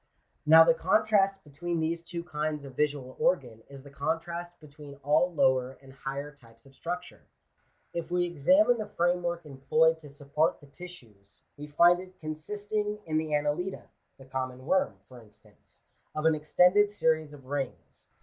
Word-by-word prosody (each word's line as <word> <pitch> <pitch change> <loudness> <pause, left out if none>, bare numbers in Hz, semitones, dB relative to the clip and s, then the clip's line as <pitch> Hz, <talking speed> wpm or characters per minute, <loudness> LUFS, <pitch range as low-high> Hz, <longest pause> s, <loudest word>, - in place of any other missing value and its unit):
Now 160 +1 +10
the 165 0 +5
contrast 195 +2 +2
between 170 +4 -4
these 165 +1 -1
two 170 0 -6
kinds 150 -3 -3
of 135 -2 -10
visual 140 -3 -1
organ 125 -11 0
is 140 -1 -11
the 140 - -13
contrast 165 +4 -4
between 145 -2 -12
all 155 +5 +3
lower 130 -5 +2
and 135 -1 -16
higher 140 +2 -6
types 115 -5 -21
of 135 - -18
structure. 175 +5 -6 0.7
If 170 -1 -4
we 175 0 +1
examine 235 - +3
the 215 - -4
framework 175 -1 -1
employed 155 +4 +2
to 150 -2 -12
support 145 +4 -1
the 145 - -16
tissues, 130 - -13
we 145 +1 -8
find 175 +4 +5
it 185 0 -12
consist 155 +7 -6
ing 210 0 0
in 155 -1 0
the 155 -1 -3
Annelida 150 +6 -2 0.3
(the 135 - -14
common 130 -1 -5
worm, 160 - +1
for 125 -2 -13
instance) 105 -2 -19 0.3
of 155 - -2
an 160 - +5
extended 180 +7 +4
series 160 -6 0
of 135 -2 -16
rings. 135 -1 -6
155 Hz, 165 wpm, -29 LUFS, 140-175 Hz, 0.7 s, Now